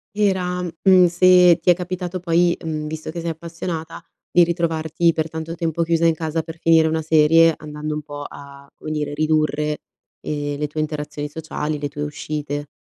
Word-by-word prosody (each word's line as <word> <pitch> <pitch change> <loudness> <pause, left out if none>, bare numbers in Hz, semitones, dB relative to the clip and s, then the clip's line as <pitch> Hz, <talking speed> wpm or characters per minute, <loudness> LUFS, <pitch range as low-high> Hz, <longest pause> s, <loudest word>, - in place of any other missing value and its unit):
Era, 185 -3 0
mhmm, 180 +2 +4
se 180 0 +5
ti 175 - +1
è 175 - +7
capitato 180 0 -4
poi, 170 0 +2
mhmm, 155 -2 -3
visto 155 0 -6
che 170 - -6
sei 170 - -3
appassionata, 165 0 -6 0.3
di 175 - +6
ritrovarti 165 -1 0
per 160 0 -2
tanto 160 +1 -5
tempo 170 -1 -1
chiusa 165 0 +1
in 165 - +5
casa 160 0 -2
per 160 0 -9
finire 160 -1 +4
una 160 0 0
serie 160 +1 +5
andando 150 0 -6
un 150 - -3
po' 145 -1 -8
a, 140 0 -13
come 155 - -7
dire, 150 -1 -2
ridurre, 150 0 0 0.4
ehm, 145 -1 -3
le 150 - -1
tue 155 +1 -6
interazioni 150 -1 -4
sociali, 155 -1 -4
le 145 - -2
tue 145 +1 -5
uscite. 150 -1 -4
160 Hz, 185 wpm, -21 LUFS, 150-170 Hz, 0.4 s, è